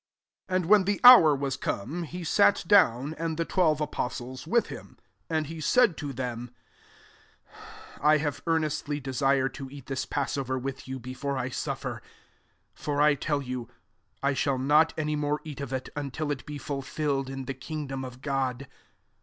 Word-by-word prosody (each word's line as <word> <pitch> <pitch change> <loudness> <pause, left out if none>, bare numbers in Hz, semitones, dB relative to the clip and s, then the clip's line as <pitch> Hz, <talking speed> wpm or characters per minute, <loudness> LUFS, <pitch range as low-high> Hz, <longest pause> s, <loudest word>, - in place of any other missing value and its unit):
14 185 0 +1
And - - -5
when 205 0 +6
the 205 +1 0
hour 235 - +10
was 135 -1 -2
come, 150 - -3
he 175 +2 -6
sat 200 +4 +3
down, 150 - +4
and 165 -1 -2
the 165 - 0
twelve 160 -5 +2
apostles 130 -2 -4
with 235 +6 +3
him. - - -10 0.3
15 160 - +1
And 155 - 0
he 160 +2 -7
said 220 - +4
to 145 -2 -4
them, 125 -2 -5 0.8
" - - -32 0.7
I 155 +1 +5
have 150 -1 -3
earnestly 155 -2 0
desired 135 0 +1
to 135 -1 -7
eat 140 -1 -11
this 130 -1 -3
passover 135 -2 -2
with 135 +1 -5
you 130 0 -4
before 130 +3 -4
I 130 0 -2
suf - - -4
fer: - - -5 0.7
16 - - -20
for 145 -1 -1
I 150 0 +5
tell 145 +1 -1
yoH, 125 -2 -5 0.6
I 140 +1 +2
shall 135 0 0
not 150 +4 +4
any 150 -1 -1
more 150 0 -1
eat 150 -3 -7
of 140 - -5
it, 130 -1 -3
until 145 +1 -3
it 140 - -5
be 150 -1 -5
fulfilled 140 -1 -2
in 135 -1 -5
the 135 - -3
kingdom 135 0 -5
of 130 0 -9
God." 135 -2 -2
140 Hz, 185 wpm, -27 LUFS, 130-155 Hz, 0.8 s, hour